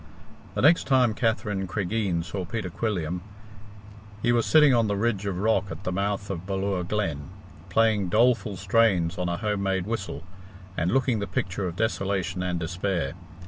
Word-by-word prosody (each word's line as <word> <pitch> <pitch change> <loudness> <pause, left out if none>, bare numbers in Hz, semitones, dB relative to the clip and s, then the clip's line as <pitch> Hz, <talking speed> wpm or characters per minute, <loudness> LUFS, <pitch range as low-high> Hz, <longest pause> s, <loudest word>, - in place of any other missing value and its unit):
The - - -1
next 160 +1 +5
time 130 -4 +4
Katherine 105 -4 -1
Cregeen 95 -2 -1
saw 95 +1 -4
Peter 90 0 -4
Quilliam, 90 -5 -2 1.0
he 120 - +3
was 120 -1 +2
sitting 150 -3 +6
on 115 -2 +3
the 100 -1 0
ridge 105 -2 0
of 95 -3 -2
rock 100 0 +2
at - - -7
the 90 - -2
mouth 100 +1 -2
of 95 0 -6
Ballure 95 -1 -1
Glen, 85 -7 -2 0.4
playing 105 -1 +2
doleful 115 -1 +2
strains 95 -3 +2
on 90 -1 -1
a 85 - -1
home 105 -1 -1
made 95 -2 0
whistle, 100 -9 -4 0.5
and 85 0 0
looking 130 -2 +2
the 100 - -3
picture 100 -6 -2
of 85 - -5
desolation 95 -4 -1
and 90 -1 -1
despair. 85 -3 -2
100 Hz, 170 wpm, -26 LUFS, 90-110 Hz, 1.0 s, sitting